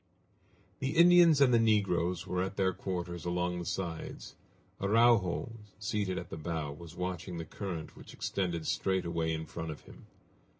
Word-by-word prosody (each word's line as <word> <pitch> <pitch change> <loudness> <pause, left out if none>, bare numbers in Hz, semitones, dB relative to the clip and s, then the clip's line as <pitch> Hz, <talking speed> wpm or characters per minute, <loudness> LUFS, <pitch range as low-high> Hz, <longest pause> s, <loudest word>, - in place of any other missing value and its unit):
The 135 +3 -2
Indians 170 -3 +7
and 130 -3 +6
the 115 - +6
negroes 95 -5 +2
were 90 -1 -1
at 95 +2 -3
their 95 -1 +2
quarters 90 -2 -4
along 90 0 -1
the 85 - -5
sides. 85 -3 -5 0.5
Araujo, 115 +1 +3 0.3
seated 100 -2 -2
at - - -6
the - - -5
bow, 80 -2 -3
was 80 +3 -10
watching 90 -1 -4
the 80 - -5
current 85 -3 -6
which - - -12
extended 85 -4 -2
straight 95 -1 0
away 85 -1 -1
in 80 0 -3
front 80 0 -6
of 75 - -7
him. - - -15
90 Hz, 165 wpm, -31 LUFS, 85-105 Hz, 0.5 s, Indians